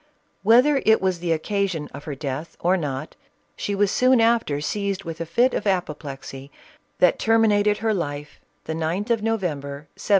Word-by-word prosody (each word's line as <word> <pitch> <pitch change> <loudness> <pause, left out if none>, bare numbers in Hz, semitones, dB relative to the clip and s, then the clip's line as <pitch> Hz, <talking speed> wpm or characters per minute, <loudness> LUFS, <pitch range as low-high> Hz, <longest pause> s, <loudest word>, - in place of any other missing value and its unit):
Whether 260 +5 +5
it 220 0 +5
was 185 -2 0
the 170 -1 -2
occasion 180 -1 -1
of 145 +1 -9
her 145 - -4
death 140 +3 -5
or 180 +2 +2
not, 145 -4 -4 0.4
she 200 - -3
was 200 0 +2
soon 255 0 +4
after 225 -11 +2
seized 200 +5 -2
with 165 0 -6
a 165 - -4
fit 240 +10 +2
of 210 - -2
apoplexy, 145 -7 -3 0.5
that 180 -2 +3
terminated 210 -2 +3
her 220 0 0
life, 145 -5 -4 0.2
the 160 - -4
9th 170 +8 -2
of 230 -2 +2
November, 150 -10 -3
1796. - - -9
180 Hz, 170 wpm, -23 LUFS, 150-215 Hz, 0.5 s, Whether